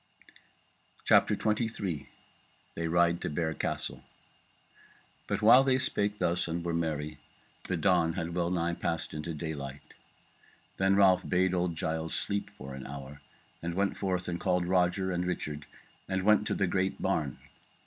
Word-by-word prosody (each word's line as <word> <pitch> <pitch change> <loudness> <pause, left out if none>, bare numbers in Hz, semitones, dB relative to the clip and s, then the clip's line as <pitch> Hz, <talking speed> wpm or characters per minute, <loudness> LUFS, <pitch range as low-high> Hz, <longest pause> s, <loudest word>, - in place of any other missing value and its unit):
CHAPTER - - +5
23 105 - -1 0.6
They 85 0 -2
Ride 85 0 +3
to - - -2
Bear 80 +1 -1
Castle - - -3 1.3
But - - -1
while 120 +5 +8
they 130 -1 +3
spake 105 -6 0
thus 85 -1 0
and 85 +1 -3
were 85 - -1
merry, 75 -2 -2 0.5
the 90 - -1
dawn 85 -1 +3
had 85 +1 -3
wellnigh 85 -1 0
passed 85 -1 -3
into 75 +2 -4
daylight. 70 -3 -6 0.8
Then 95 0 +3
Ralph 95 -2 +4
bade 95 0 +2
old 90 -2 0
Giles 80 -1 -2
sleep 100 0 -2
for 65 +1 -8
an 65 0 -7
hour, 70 +1 -8 0.4
and 85 0 -3
went 100 +1 +1
forth 90 -2 -2
and 85 -1 -2
called 90 -2 +1
Roger 90 +1 +2
and 90 0 -1
Richard 75 -5 -4 0.4
and 95 0 0
went 105 +1 +4
to - - 0
the 100 - +2
great 95 +1 0
barn. 75 -9 -1
85 Hz, 150 wpm, -30 LUFS, 80-95 Hz, 1.3 s, while